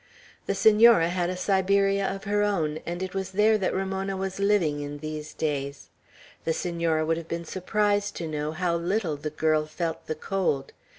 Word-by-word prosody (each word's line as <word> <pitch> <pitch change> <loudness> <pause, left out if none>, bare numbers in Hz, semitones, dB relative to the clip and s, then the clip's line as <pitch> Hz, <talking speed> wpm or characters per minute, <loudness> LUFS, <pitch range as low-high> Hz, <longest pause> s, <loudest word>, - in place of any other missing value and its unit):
The - - 0
Senora 220 -5 +6
had 175 0 0
a 185 - -3
Siberia 195 +1 +2
of 195 0 -4
her 205 +1 +1
own, 165 -7 0
and 175 +2 -3
it 185 - -5
was 190 -1 -3
there 215 +2 +4
that 190 - 0
Ramona 190 0 -2
was 190 0 -4
living 200 -8 +2
in 145 0 -5
these 155 0 -6
days. 140 -2 -3 0.5
The 160 - 0
Senora 170 -2 0
would 165 +1 +1
have 165 -1 -7
been 170 0 -4
surprised 205 +3 0
to 165 - -4
know 150 -1 -2
how 170 +1 0
little 175 -1 -1
the 145 +2 -4
girl 155 0 +1
felt 160 +1 -4
the 155 - -2
cold. 155 -5 -1
175 Hz, 185 wpm, -26 LUFS, 155-195 Hz, 0.5 s, Senora